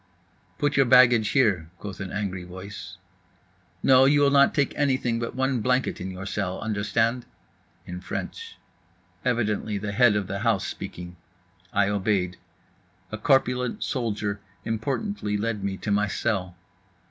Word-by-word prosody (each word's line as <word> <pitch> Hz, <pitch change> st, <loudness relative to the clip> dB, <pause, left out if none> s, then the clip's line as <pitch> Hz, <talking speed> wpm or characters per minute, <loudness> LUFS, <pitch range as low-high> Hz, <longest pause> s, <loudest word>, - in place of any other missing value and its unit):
"Put 145 Hz, -1 st, 0 dB
your 135 Hz, -2 st, +5 dB
baggage 120 Hz, -3 st, +6 dB
in -, -, -4 dB
here," 90 Hz, -8 st, 0 dB
quoth 100 Hz, -3 st, -8 dB
an 95 Hz, -2 st, -5 dB
angry 95 Hz, -3 st, -3 dB
voice. 95 Hz, +3 st, -9 dB, 0.9 s
"No, 130 Hz, 0 st, +6 dB
you 145 Hz, +1 st, +4 dB
will 140 Hz, -1 st, +4 dB
not 140 Hz, 0 st, +5 dB
take 140 Hz, -2 st, +1 dB
anything 130 Hz, -5 st, +1 dB
but 115 Hz, 0 st, -4 dB
one 130 Hz, -2 st, 0 dB
blanket 125 Hz, +3 st, 0 dB
in 95 Hz, -, -4 dB
your 95 Hz, +1 st, -7 dB
cell, 95 Hz, -2 st, -3 dB
understand." 110 Hz, +3 st, 0 dB, 0.6 s
In 90 Hz, 0 st, -7 dB
French. 460 Hz, -, -6 dB, 0.7 s
Evidently 110 Hz, -4 st, 0 dB
the 100 Hz, +1 st, -4 dB
head 115 Hz, 0 st, +4 dB
of 105 Hz, -1 st, 0 dB
the 100 Hz, +1 st, -4 dB
house 110 Hz, -3 st, +1 dB
speaking. 90 Hz, 0 st, -7 dB, 0.5 s
I 100 Hz, 0 st, +2 dB
obeyed. 95 Hz, -3 st, 0 dB, 0.7 s
A 110 Hz, -, -4 dB
corpulent 125 Hz, -1 st, +1 dB
soldier 105 Hz, -5 st, -2 dB, 0.3 s
importantly 115 Hz, -, -2 dB
lead 105 Hz, -1 st, -2 dB
me 100 Hz, -1 st, -2 dB
to 105 Hz, -, -4 dB
my 105 Hz, +1 st, +2 dB
cell. 95 Hz, -5 st, -2 dB
110 Hz, 145 wpm, -25 LUFS, 100-125 Hz, 0.9 s, baggage